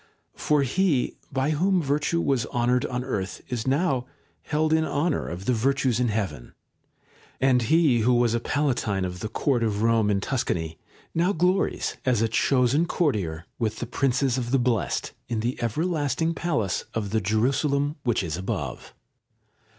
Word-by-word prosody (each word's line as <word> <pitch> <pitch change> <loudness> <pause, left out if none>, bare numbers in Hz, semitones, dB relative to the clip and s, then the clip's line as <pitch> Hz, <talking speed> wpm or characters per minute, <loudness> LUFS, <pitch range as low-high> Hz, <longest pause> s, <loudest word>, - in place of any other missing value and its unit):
For 150 -2 +2
he, 145 0 +1 0.2
by 135 +3 0
whom 185 +5 +2
virtue 150 +2 0
was 130 -7 0
honoured 125 +1 +1
on 125 0 -3
earth, 100 -8 -3
is 120 -1 -3
now 135 -3 +1 0.3
held 155 +1 0
in 160 0 +3
honour 155 +1 0
of 90 +3 -6
the 125 - +2
Virtues 130 0 +1
in 125 - +2
heaven; 95 - -3 0.8
and 130 -1 +3
he 145 0 +3
who 120 +3 +3
was 120 -1 +3
a 120 - +1
Palatine 120 -8 0
of 90 0 -5
the 110 - -4
Court 125 +2 0
of 110 -2 0
Rome 115 -2 +3
in 100 -1 +2
Tuscany 85 - -2 0.3
now 175 +4 +2
glories 180 +3 0
as 120 -4 +2
a - - +3
chosen 130 +7 +2
courtier 95 - -1
with 110 -2 0
the 120 - -3
princes 130 +1 +1
of 120 -1 -3
the 135 - +3
Blest 120 -4 0 0.2
in 115 -2 -2
the 120 +3 -2
everlasting 155 - 0
palace 135 - -1
of 105 -3 -2
the 110 0 +1
Jerusalem 140 +8 +1
which 120 -5 +1
is 80 -3 -3
above. 95 - -5
125 Hz, 165 wpm, -25 LUFS, 110-145 Hz, 0.8 s, in